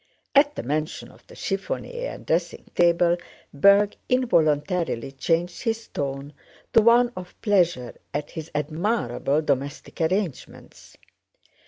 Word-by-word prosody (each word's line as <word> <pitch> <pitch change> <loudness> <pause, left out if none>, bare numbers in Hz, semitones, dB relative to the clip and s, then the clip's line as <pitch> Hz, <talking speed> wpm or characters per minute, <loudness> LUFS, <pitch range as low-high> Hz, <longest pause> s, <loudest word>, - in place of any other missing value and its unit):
(At 290 +1 +5
the - - -4
mention 155 +4 -3
of - - -21
the - - -14
chiffonier 485 - -3
and - - -13
dressing - - -1
table 175 0 +3 0.4
Berg 200 +7 +5
involuntarily 165 - +1
changed 165 +6 -1
his 225 -1 -2
tone 140 +1 -4 0.4
to 225 - +7
one 240 +2 +5
of 180 -1 -9
pleasure 175 - +2 0.2
at 145 0 -4
his 160 -1 -7
admirable 155 - 0
domestic 145 +4 -3
arrangements.) 170 -3 -3
170 Hz, 120 wpm, -24 LUFS, 145-210 Hz, 0.4 s, to